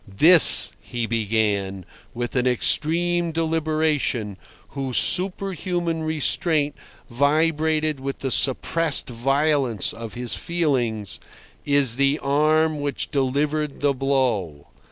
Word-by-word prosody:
"This," 155 - +8
he 120 -2 -5
began, 105 -4 -2 0.3
with 120 +2 -5
an 125 0 0
extreme 170 +7 +1
deliberation, 155 -9 -2 0.3
whose 135 -3 -4
superhuman 180 -3 -1
restraint 155 -1 -1 0.3
vibrated 155 +3 0
with 135 +1 -6
the 135 - -5
suppressed 140 +3 +1
violence 135 -2 0
of 115 0 -9
his 125 -1 -4
feelings, 125 - -3 0.5
"is 140 -4 +1
the 140 +1 +1
arm 155 +2 0
which 145 -1 -4
delivered 145 +2 -2
the 145 -1 +1
blow. 125 - -2
140 Hz, 100 wpm, -21 LUFS, 120-155 Hz, 0.5 s, This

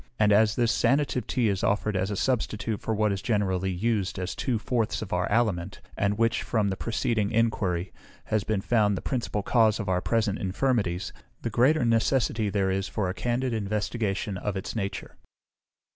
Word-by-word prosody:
And 105 -1 +4
as 110 +1 +4
this 120 -2 +2
sanative 130 +2 +1
tea 120 -3 +1
is 100 -2 -1
offered 105 0 +1
as 95 +1 0
a 105 - -2
substitute 110 -2 -1
for 110 - -1
what 105 0 +2
is 100 -1 -2
generally 95 -4 0
used 100 +1 -1
as 90 -1 -3
two 125 -4 -1
fourths 115 0 -1
of 100 - -6
our 90 +1 0
aliment, 100 -6 0 0.2
and 100 0 0
which, 115 0 +2
from 110 -4 0
the 95 - -1
preceding 110 0 -1
enquiry, 100 -6 0 0.3
has 110 -2 0
been 105 -2 -1
found 105 -3 +2
the - - -4
principal 115 -5 -2
cause 110 -2 +3
of 105 - -4
our 90 -1 +1
present 110 -1 0
infirmities, 95 -3 -1 0.3
the 115 - -2
greater 130 +5 +3
necessity 115 -1 +1
there 95 -1 +1
is 95 0 -1
for 100 -4 -2
a - - -2
candid 120 +6 -1
investigation 105 -2 -2
of 100 0 -3
its 95 - -5
nature. 100 -3 -4
105 Hz, 185 wpm, -27 LUFS, 95-115 Hz, 0.3 s, And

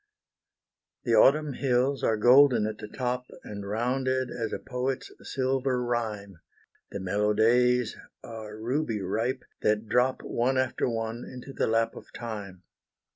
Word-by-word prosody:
The - - 0
Autumn 150 +1 +5
hills 130 +1 +1
are 110 - +2
golden 125 0 +6
at 110 0 -4
the 105 - -7
top, 125 +2 -3 0.2
And 100 -1 -7
rounded 130 +3 0
as 115 -2 -3
a - - -2
poet's 130 +1 -3
silver 130 -1 0
rhyme; 110 -6 -3 0.5
The 100 - -5
mellow 105 +3 +1
days 125 +1 +3 0.3
are 110 -2 -8
ruby 120 0 -1
ripe, 115 +7 -1 0.2
that 105 +1 +1
drop 125 +4 +2
One 130 +3 0
after 130 0 0
one 115 0 -3
into 130 +2 -9
the - - 0
lap 115 0 +1
of - - -12
time. 100 -6 -7
120 Hz, 140 wpm, -28 LUFS, 110-130 Hz, 0.5 s, golden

